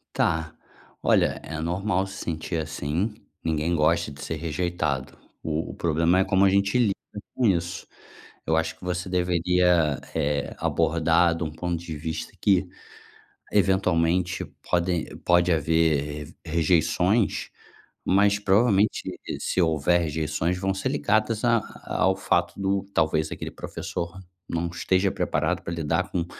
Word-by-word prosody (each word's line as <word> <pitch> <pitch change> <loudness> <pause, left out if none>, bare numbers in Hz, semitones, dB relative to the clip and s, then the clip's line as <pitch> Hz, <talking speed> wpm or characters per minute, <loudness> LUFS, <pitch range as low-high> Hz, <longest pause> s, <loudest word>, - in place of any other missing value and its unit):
Tá, 80 -1 0 0.5
olha - - +2
é 80 +1 -6
normal 90 +3 0
se 95 - -9
sentir 85 +1 -3
assim, 80 +7 -2 0.3
ninguém 80 +1 0
gosta 80 0 +2
de 70 0 -11
ser 80 - -3
rejeitado, 80 -3 -2 0.2
o 80 +1 -2
o - - -9
problema 85 +2 +2
é - - +5
como 95 0 +3
a 95 - +6
gente 100 +3 +2
lida 110 -6 +3 0.4
com 125 - +2
isso. 85 -2 -1 0.6
Eu 80 - +2
acho 80 - 0
que - - -31
você 90 0 -2
deveria, 90 -3 +2
eh, 70 0 -1
abordar 85 +1 +2
de 85 - -2
um 75 - -4
ponto 85 +2 -2
de 80 -1 -6
vista 80 +1 -5
que 95 -2 +3 0.8
eventualmente 90 -3 +2 0.3
podem 90 -1 +1 0.2
pode 90 0 +4
haver 75 -2 0
rejeições, 90 +6 +1 0.6
mas 100 +2 +3
provavelmente 105 +1 +3 0.2
e - - -4
se - - 0
houver 85 +1 +2
rejeições 80 +2 -1
vão 95 +1 0
ser 100 +7 -2
ligadas 110 -4 +1
a 115 -1 +4 0.3
ao 95 +1 +3
fato 85 -2 0
do 95 0 0
talvez 80 -1 +1
aquele - - -5
professor 85 +1 -5 0.3
não 85 +1 -1
esteja 95 +3 +1
preparado - - 0
pra 85 - -6
lidar 85 +3 -1
com 85 -2 0
85 Hz, 140 wpm, -25 LUFS, 80-95 Hz, 0.8 s, a